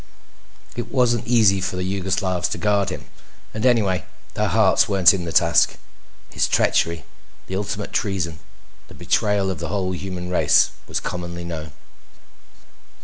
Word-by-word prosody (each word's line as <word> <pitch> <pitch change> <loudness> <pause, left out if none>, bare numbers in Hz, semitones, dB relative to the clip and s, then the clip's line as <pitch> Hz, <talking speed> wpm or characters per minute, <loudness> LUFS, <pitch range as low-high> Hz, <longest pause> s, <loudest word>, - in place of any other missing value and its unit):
It 120 - -5
wasn't 120 -4 +1
easy 110 -5 +4
for 90 - -3
the 90 - -3
Yugoslavs 95 -1 -1
to - - -3
guard 100 -3 +1
him 95 - -7 0.5
and, 110 - -4
anyway, 100 -8 +2 0.3
their - - 0
hearts 115 - +3
weren't 95 -3 +6
in 90 -3 -3
the 85 - -4
task. - - +3 0.5
His - - +1
treachery, 85 0 +1 0.4
the 95 - -6
ultimate 105 +1 -4
treason, 90 -6 -2 0.5
the - - -14
betrayal 105 -3 0
of - - -6
the - - -4
whole 95 -2 -2
human 90 -1 -5
race, 90 - +4 0.2
was - - -2
commonly 85 -1 -5
known. 80 -3 -6
95 Hz, 145 wpm, -22 LUFS, 90-105 Hz, 0.5 s, weren't